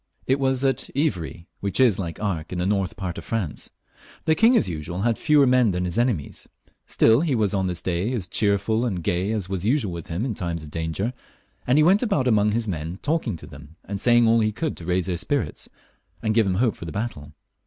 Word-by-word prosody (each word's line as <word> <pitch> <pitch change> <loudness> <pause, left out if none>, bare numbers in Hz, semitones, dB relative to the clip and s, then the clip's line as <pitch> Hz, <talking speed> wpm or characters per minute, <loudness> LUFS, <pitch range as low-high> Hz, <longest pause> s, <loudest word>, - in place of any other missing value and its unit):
It 135 +2 +1
was 135 0 +1
at 135 - 0
Ivry, 90 - -2
which 100 +4 -2
is, 120 -7 +4
like 85 -4 -4
Arques, 90 -7 -3
in 90 - -3
the 90 - -1
north 95 -2 0
part 90 -3 -4
of - - -10
France. 105 -9 -4 0.6
The 160 - +4
king, 230 +8 +5
as - - +2
usual, 85 +2 -4
had 115 +2 +2
many - - -16
fewer 150 -2 +5
men 125 -3 +4
than 90 -1 -1
his 90 +4 -2
enemies; 115 - -2 0.4
still 115 +4 +4
he 160 -6 +1
was 105 -4 +1
on 95 -1 0
this 90 -1 -2
day 90 +5 -1
as 110 -8 -1
cheerful 100 +4 +1
and 95 -9 -2
gay 90 +5 0
as 105 -5 -2
was 95 -2 -3
usual* 110 -4 +1
with 85 -2 -7
him 90 +8 -2
in 125 - -2
times 85 -4 -4
of 75 - -10
danger, 80 +9 -2 0.5
and 125 +3 +4
he 155 - +6
went 190 +6 +5
about 195 - +1
among 105 -3 +3
the 110 +1 -1
men 85 -1 -4
talking 145 - -1
to - - -10
them, 75 +3 -13
and 100 -1 -5
saying 120 -1 +5
all 115 +1 +4
he 110 -1 +2
could 150 +9 -3
to 85 - -9
raise 90 0 0
their 90 -2 -2
spirits 145 - -2 0.5
and 110 -1 +1
give 110 -2 +3
them 95 - 0
hope 115 +1 +1
for - - -9
the 80 - -6
battle. 80 -9 -5
100 Hz, 240 wpm, -24 LUFS, 90-120 Hz, 0.6 s, he